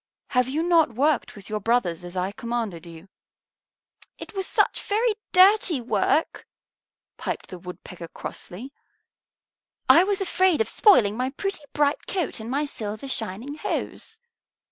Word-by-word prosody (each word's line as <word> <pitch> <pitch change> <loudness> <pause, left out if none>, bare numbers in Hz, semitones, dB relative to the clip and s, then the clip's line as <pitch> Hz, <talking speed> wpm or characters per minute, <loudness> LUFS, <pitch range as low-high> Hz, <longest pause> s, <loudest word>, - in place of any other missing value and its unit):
Have 250 -1 +2
you 305 +5 -1
not 330 -8 +3
worked 285 +2 +1
with 200 -2 -12
your 215 0 -2
brothers 195 -6 0
as 175 +1 -8
I 185 +2 -1
commanded 220 -7 -4
you?" 165 +2 -12 1.1
"It - - -9
was 385 -1 -3
such - - +1
very 445 +3 +1 0.2
dirty 370 -4 +5
work," 240 - 0 0.7
piped - - -4
the 180 - -8
Woodpecker 180 -1 -9
crossly; 235 - -8 1.1
"I 340 - +8
was 395 0 0
afraid 375 -2 +2
of 450 - +2
spoiling 225 - +5
my 255 +2 -1
pretty 390 +5 -4
bright 290 0 +1
coat 360 -11 -2
and 220 +1 -7
my 285 +4 0
silver 215 -2 -6
shining 230 +2 -3
hose." - - -4
250 Hz, 145 wpm, -25 LUFS, 200-340 Hz, 1.1 s, I